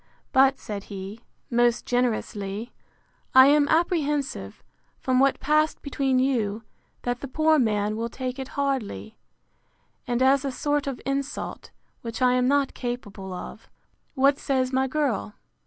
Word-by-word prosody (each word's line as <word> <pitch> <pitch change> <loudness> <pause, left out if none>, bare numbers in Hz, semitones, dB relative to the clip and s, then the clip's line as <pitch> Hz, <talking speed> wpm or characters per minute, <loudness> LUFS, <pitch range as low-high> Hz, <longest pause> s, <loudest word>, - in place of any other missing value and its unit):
But, 270 0 +5
said 205 -2 -6
he, 200 +2 -7 0.3
most 240 0 +2
generously, 225 -3 -2 0.6
I 260 0 +10
am 290 +1 +5
apprehensive, 300 -4 0 0.3
from 255 -1 +1
what 275 0 +3
passed 305 +2 +1
between 270 -2 0
you, 230 -5 0 0.4
that 245 0 -1
the 275 - -6
poor 310 +3 +3
man 210 -3 +1
will 230 +1 -3
take 255 +1 -5
it 265 - -4
hardly, 225 - -2 0.9
and 245 +1 +1
as 270 +1 +4
a 275 - -2
sort 290 +2 -1
of 270 -3 -3
insult, 275 +1 -3 0.3
which 230 -1 -6
I 250 -1 +4
am 250 0 +2
not 280 0 +2
capable 210 -6 -5
of. 180 - -8 0.5
What 275 +1 +3
says 260 -1 0
my 265 +1 +2
girl? 260 -7 -1
255 Hz, 140 wpm, -25 LUFS, 230-275 Hz, 0.9 s, I